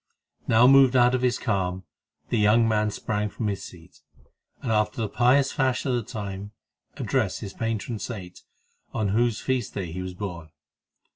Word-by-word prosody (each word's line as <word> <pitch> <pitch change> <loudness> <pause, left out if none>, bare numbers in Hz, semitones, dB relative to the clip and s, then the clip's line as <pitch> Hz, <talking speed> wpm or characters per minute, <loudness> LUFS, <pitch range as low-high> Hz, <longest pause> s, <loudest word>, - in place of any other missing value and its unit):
Now 115 +2 +5
moved 135 -1 +6
out 125 0 +5
of 130 - +1
his 125 -1 +2
calm, 95 -3 -1 0.5
the 115 - +1
young 110 +2 +4
man 105 -1 +1
sprang 105 0 -2
from 110 - -5
his 100 - -4
seat, 85 -3 -13 0.6
and, 120 - -3
after 105 +1 +1
the 110 - 0
pious 130 +5 +3
fashion 130 -1 0
of - - +1
the - - -12
time, 100 -2 -6 0.4
addressed - - -1
his 95 - -6
patron 115 -1 -3
saint, 95 -7 -7 0.5
on 105 -2 0
whose 115 +2 +1
feast 130 -5 -2
day 90 -5 -4
he 90 +3 -5
was 90 -1 -6
born. 90 -5 -6
110 Hz, 170 wpm, -25 LUFS, 100-120 Hz, 0.6 s, moved